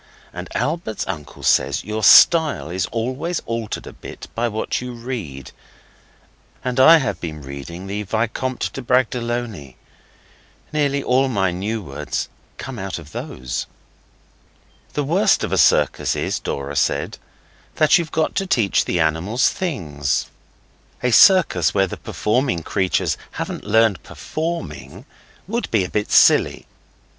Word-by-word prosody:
And - - -7
Albert's 145 -3 -2
uncle 75 -6 -7
says - - +2
your 110 0 -4
style 145 - +6
is 90 0 -1
always 130 +9 -2
altered 115 -2 -4
a - - -9
bit - - -10
by 120 +1 0
what 110 +1 -2
you 125 0 -6
read. 115 - -6 1.1
And 125 0 -2
I 160 +5 +9
have 135 -5 -2
been 75 -3 -6
reading 70 +7 -8
the 100 +2 -4
Vicomte 115 +5 -2
de 135 - -5
Bragelonne. 120 - -1 1.0
Nearly 140 -2 +1
all 130 +2 +2
my 95 -7 0
new 105 +5 -3
words 70 -5 -4 0.3
come 130 -3 -7
out 95 0 -4
of 80 -2 -11
those.) 65 -4 -5 1.3
'The 145 - -1
worst 190 +8 +2
of - - -2
a - - +2
circus - - +3
is,' - - -2
Dora 70 +1 -4
said, - - 0 0.6
'that 155 +3 +5
you've 165 -2 -4
got 160 -1 0
to 195 -1 0
teach 115 - +2
the 90 - -1
animals 80 +9 +1
things. 75 - -2 0.7
A 125 - +2
circus 155 - +5
where 95 -1 +4
the 95 - -7
performing 115 -6 -1
creatures 95 +2 0 0.2
hadn't - - -5
learned 110 -1 +3
performing 95 - -6 0.4
would 235 +4 -2
be 110 -4 +2
a 90 - -5
bit 105 0 -2
silly. - - +4
115 Hz, 140 wpm, -21 LUFS, 90-130 Hz, 1.3 s, I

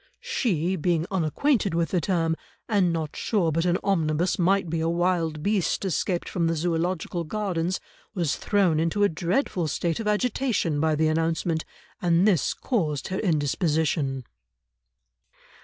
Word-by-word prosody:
She, 210 - 0
being 170 -1 0
unacquainted 195 - +1
with 170 -1 +1
the 180 - +1
term, 165 -2 +1 0.3
and 200 -6 +2
not 160 -2 -3
sure 185 -7 0
but 165 +2 0
an 175 0 +2
omnibus 170 -2 +1
might 190 +1 +2
be 165 0 -2
a 165 +1 0
wild 170 -3 0
beast 200 -1 0
escaped 180 0 -1
from 170 -2 0
the 165 - +1
Zoological 170 +1 -1
Gardens, 185 -1 -2 0.4
was 170 -6 0
thrown 190 -7 +2
into 165 +6 +1
a 205 - +5
dreadful 175 - -1
state 165 +4 -1
of 220 - -3
agitation 210 - 0
by 155 0 +2
the 155 +1 +2
announcement, 160 +1 0 0.4
and 175 +2 +3
this 180 -9 +2
caused 155 - -1
her 190 - -2
indisposition." 150 -4 0
170 Hz, 145 wpm, -25 LUFS, 160-195 Hz, 0.4 s, a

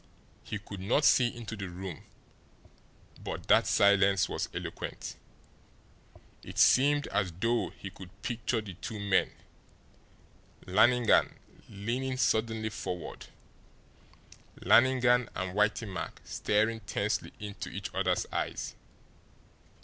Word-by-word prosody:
He 105 - -5
could 100 -1 -9
not 115 +10 +2
see 125 - +6
into 115 -2 -6
the 95 -3 -6
room, 90 -2 -7 1.2
but - - -6
that - - +5
silence 100 -1 +4
was - - -3
eloquent. - - -6 1.3
It - - -10
seemed 145 +2 +5
as 100 -2 0
though 115 +7 0
he 95 - -9
could 95 0 -11
picture 120 -1 -1
the 100 -3 -8
two 105 +4 -7
men 100 -2 +2 1.4
Lannigan 115 +5 +4 0.3
leaning 125 +6 -3
suddenly 110 -2 +1
forward 90 -5 -6 1.3
Lannigan 125 -1 +4
and 90 0 -3
Whitey 105 +2 +1
Mack 95 -3 -6
staring 110 +2 0
tensely 100 0 -2
into 105 -1 -6
each 100 -2 -6
other's 95 -1 +1
eyes. - - -3
105 Hz, 110 wpm, -30 LUFS, 95-120 Hz, 1.4 s, see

